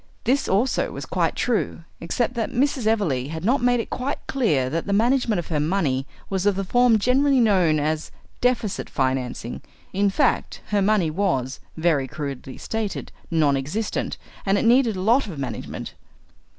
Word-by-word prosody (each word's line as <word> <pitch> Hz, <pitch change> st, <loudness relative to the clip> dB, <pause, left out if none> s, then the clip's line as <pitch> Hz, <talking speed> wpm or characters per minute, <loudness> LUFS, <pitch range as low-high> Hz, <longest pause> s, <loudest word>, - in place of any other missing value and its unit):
This 265 Hz, +4 st, +1 dB
also 220 Hz, +7 st, +1 dB
was -, -, -6 dB
quite -, -, 0 dB
true, 225 Hz, -7 st, -1 dB, 0.2 s
except 235 Hz, +8 st, -1 dB
that 235 Hz, -3 st, -2 dB
Mrs. 260 Hz, -2 st, 0 dB
Everleigh 165 Hz, -, +1 dB
had 160 Hz, +2 st, -5 dB
not 255 Hz, +5 st, +3 dB
made 245 Hz, 0 st, +3 dB
it 230 Hz, -, -4 dB
quite 265 Hz, +3 st, -2 dB
clear 180 Hz, -, +1 dB
that 165 Hz, +7 st, -2 dB
the 200 Hz, -, 0 dB
management 235 Hz, 0 st, +2 dB
of 175 Hz, -, -4 dB
her 155 Hz, -3 st, 0 dB
money 145 Hz, -5 st, 0 dB, 0.2 s
was 195 Hz, 0 st, -1 dB
of 205 Hz, -, +3 dB
the 195 Hz, -, -1 dB
form 245 Hz, +3 st, +4 dB
generally 265 Hz, +5 st, +3 dB
known 185 Hz, -9 st, +3 dB
as 155 Hz, +1 st, -1 dB, 0.3 s
deficit 245 Hz, -5 st, 0 dB
financing. 130 Hz, -3 st, -2 dB, 0.3 s
In 200 Hz, +1 st, +2 dB
fact, 260 Hz, +7 st, 0 dB
her 205 Hz, -1 st, +2 dB
money 195 Hz, -5 st, +2 dB
was, 145 Hz, -8 st, -1 dB, 0.2 s
very 160 Hz, -5 st, +2 dB
crudely 135 Hz, -2 st, -6 dB
stated, 220 Hz, -3 st, -4 dB, 0.2 s
nonexistent, 155 Hz, +6 st, 0 dB, 0.3 s
and 195 Hz, 0 st, +2 dB
it -, -, 0 dB
needed 235 Hz, -2 st, +4 dB
a 185 Hz, -, -3 dB
lot 235 Hz, +6 st, +3 dB
of 175 Hz, -7 st, -7 dB
management. 135 Hz, -2 st, -5 dB
200 Hz, 165 wpm, -23 LUFS, 155-235 Hz, 0.3 s, form